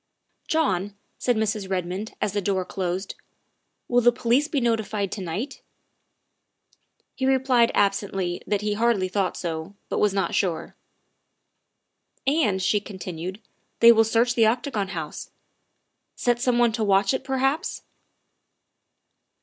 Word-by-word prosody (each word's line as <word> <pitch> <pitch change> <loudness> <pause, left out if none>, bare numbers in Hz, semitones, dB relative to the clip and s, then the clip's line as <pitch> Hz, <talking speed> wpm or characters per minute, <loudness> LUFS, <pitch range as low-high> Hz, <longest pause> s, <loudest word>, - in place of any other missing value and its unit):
' - - -50
' - - -43
"John," 200 - 0 0.2
said 245 - +1
Mrs. 215 -2 -1
Redmond 185 +3 -3
as 205 - -1
the 205 - 0
door 190 -1 0
closed, 185 +1 -3 0.4
" - - -51
will 245 0 +3
the 240 0 +6
police 245 +4 +1
be 305 -3 0
notified 220 -4 -1
to 205 - -4
night?" 200 - -4 1.5
He 260 - -1
replied 260 -3 +3
absently 195 -3 0
that 205 -1 0
he 210 0 0
hardly 215 -3 +1
thought 190 0 -1
so, 165 +2 -5
but - - -1
was 210 - +3
not 195 0 -1
sure. 175 -5 -1 1.5
"And," 265 -9 +2
she 210 +3 +2
continued, 185 -1 -7 0.2
" - - -46
they 235 0 +9
will 225 -1 +5
search 230 +2 +2
the 235 - 0
Octa 245 +5 0
gon 205 -5 -1
House 165 -5 -6 0.9
set 240 -1 0
some 250 -1 +2
one 240 -1 +4
to 220 0 -2
watch 195 +2 +3
it, 260 - -2
perhaps 270 +2 -1
210 Hz, 150 wpm, -24 LUFS, 190-240 Hz, 1.5 s, they